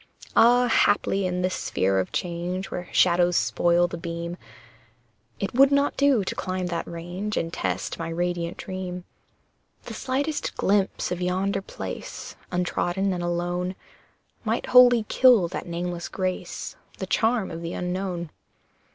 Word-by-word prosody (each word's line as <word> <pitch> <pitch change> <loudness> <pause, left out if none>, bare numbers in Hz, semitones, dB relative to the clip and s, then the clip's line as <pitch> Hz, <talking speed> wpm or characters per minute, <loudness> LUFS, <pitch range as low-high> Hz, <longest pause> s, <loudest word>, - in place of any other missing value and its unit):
Ah! 245 +2 +6
haply 200 -3 +2
in 180 0 -2
this 185 0 0
sphere 95 +1 0
of 95 - -2
change 180 +2 -3
Where 180 -1 -5
shadows 175 0 +4
spoil 175 0 +3
the 170 - -6
beam, 170 +1 -4 1.0
It 195 - -3
would 270 +3 +6
not 280 0 +2
do 280 -7 +3
to - - -3
climb 185 -1 -3
that 170 -1 -3
range 175 +5 -4
And 165 0 -2
test 90 - -2
my 165 0 -3
radiant 175 0 -2
Dream. 185 -1 -5 0.8
The - - -8
slightest 285 +4 -2
glimpse 195 -2 +1
of 180 0 -2
yonder 190 +2 0
place, - - -7 0.2
Untrodden 180 +2 0
and 175 - -3
alone, 175 +1 -2 0.7
Might 225 +1 -1
wholly 245 -3 +7
kill 245 -9 +5
that 180 - -5
nameless 175 0 -4
grace, 185 -1 -4 0.2
The - - -4
charm 225 -2 +1
of 165 0 -6
the 170 0 -4
unknown. 180 -2 -3
180 Hz, 145 wpm, -25 LUFS, 175-200 Hz, 1.0 s, wholly